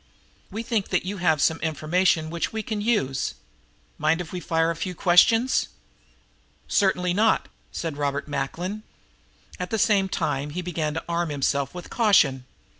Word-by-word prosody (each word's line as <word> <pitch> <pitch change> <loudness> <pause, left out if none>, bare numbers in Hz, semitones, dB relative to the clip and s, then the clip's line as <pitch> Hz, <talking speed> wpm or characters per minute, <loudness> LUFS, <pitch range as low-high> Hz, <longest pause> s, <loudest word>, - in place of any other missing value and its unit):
We 220 +2 -5
think 225 -4 -1
that 180 -1 0
you 200 +2 -4
have 160 -4 +2
some 160 - +2
information 160 +1 +1
which 170 0 -2
we 220 -1 -3
can 210 0 -3
use. 135 - 0 0.6
Mind 155 +2 +2
if 175 -2 -6
we 180 - -3
fire 165 -1 +1
a - - -4
few 180 +2 -4
questions?" 225 +8 +4 1.0
"Certainly 180 -3 +2
not," 220 +4 +2 0.2
said 160 -4 -4
Robert 140 0 -2
Macklin. 165 +9 -3 0.8
At 180 0 -3
the 225 - -1
same 205 -3 +3
time 140 -4 -1
he 180 +5 -4
began 160 -3 -2
to 165 - -3
arm 170 0 -1
himself 140 0 -1
with 180 - -8
caution. 145 - +3
175 Hz, 160 wpm, -25 LUFS, 155-195 Hz, 1.0 s, questions